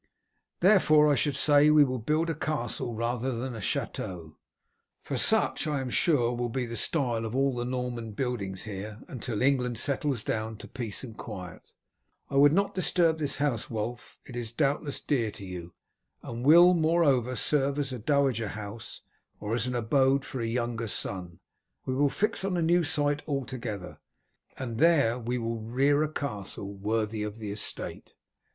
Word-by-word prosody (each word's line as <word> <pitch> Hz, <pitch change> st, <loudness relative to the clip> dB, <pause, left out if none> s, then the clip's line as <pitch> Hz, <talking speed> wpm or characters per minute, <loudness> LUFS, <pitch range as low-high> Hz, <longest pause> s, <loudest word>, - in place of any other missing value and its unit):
Therefore, 155 Hz, -6 st, +6 dB
I -, -, +5 dB
should 145 Hz, 0 st, 0 dB
say 145 Hz, +1 st, +5 dB
we 150 Hz, -1 st, +7 dB
will 130 Hz, -2 st, -1 dB
build 155 Hz, +8 st, 0 dB
a -, -, -1 dB
castle 135 Hz, -6 st, -3 dB
rather 120 Hz, +3 st, -1 dB
than 125 Hz, +2 st, -4 dB
a 110 Hz, -, -6 dB
chateau, 85 Hz, -3 st, -4 dB, 0.7 s
for -, -, -4 dB
such -, -, +2 dB
I 150 Hz, -2 st, 0 dB
am 130 Hz, -2 st, -4 dB
sure 125 Hz, -8 st, +2 dB
will 120 Hz, 0 st, -2 dB
be 125 Hz, +1 st, -2 dB
the 115 Hz, 0 st, -6 dB
style 120 Hz, -2 st, +1 dB
of 110 Hz, +2 st, -4 dB
all 135 Hz, -1 st, +2 dB
the 120 Hz, 0 st, -2 dB
Norman 125 Hz, -3 st, -3 dB
buildings 100 Hz, -6 st, -3 dB
here, 105 Hz, +1 st, -7 dB
until 120 Hz, -3 st, -3 dB
England 125 Hz, -3 st, +2 dB
settles 140 Hz, -2 st, -1 dB
down 110 Hz, 0 st, -2 dB
to -, -, -10 dB
peace 120 Hz, -4 st, -4 dB
and 115 Hz, -4 st, -8 dB
quiet. 95 Hz, -8 st, -8 dB, 0.7 s
I -, -, -3 dB
would 145 Hz, +1 st, +7 dB
not 200 Hz, +5 st, +1 dB
disturb 170 Hz, -3 st, +2 dB
this 145 Hz, -3 st, 0 dB
house, 140 Hz, -6 st, -1 dB
Wulf; 115 Hz, +2 st, -5 dB
it 125 Hz, -, -10 dB
is 120 Hz, -2 st, -3 dB
doubtless 140 Hz, +3 st, 0 dB
dear 120 Hz, -7 st, 0 dB
to 100 Hz, -, -9 dB
you, 90 Hz, -2 st, -8 dB, 0.5 s
and 120 Hz, +1 st, -6 dB
will, 170 Hz, +5 st, +8 dB
moreover, 155 Hz, -7 st, +2 dB
serve 140 Hz, +4 st, +1 dB
as 140 Hz, -3 st, -2 dB
a 125 Hz, -, -5 dB
dowager 130 Hz, -3 st, +1 dB
house 105 Hz, +1 st, -7 dB, 0.4 s
or 105 Hz, +1 st, -3 dB
as 120 Hz, +1 st, 0 dB
an 125 Hz, -, -2 dB
abode 135 Hz, +3 st, +2 dB
for 130 Hz, -, -5 dB
a 115 Hz, -, -1 dB
younger 120 Hz, -1 st, -2 dB
son. 90 Hz, -4 st, -4 dB, 0.4 s
We 130 Hz, -, -1 dB
will 140 Hz, +2 st, +3 dB
fix 210 Hz, +5 st, -1 dB
on 190 Hz, -2 st, 0 dB
a 170 Hz, -, +1 dB
new 175 Hz, +2 st, +3 dB
site 145 Hz, -2 st, 0 dB
altogether, 125 Hz, -, -4 dB, 0.6 s
and 120 Hz, -4 st, -5 dB
there 140 Hz, -7 st, +4 dB
we 120 Hz, +1 st, -2 dB
will 115 Hz, -1 st, -3 dB
rear 135 Hz, +6 st, +2 dB
a 155 Hz, 0 st, 0 dB
castle 100 Hz, -8 st, -5 dB
worthy 110 Hz, +2 st, -1 dB
of 105 Hz, 0 st, -4 dB
the 105 Hz, -2 st, -5 dB
estate. 105 Hz, 0 st, -4 dB
125 Hz, 175 wpm, -28 LUFS, 110-145 Hz, 0.7 s, will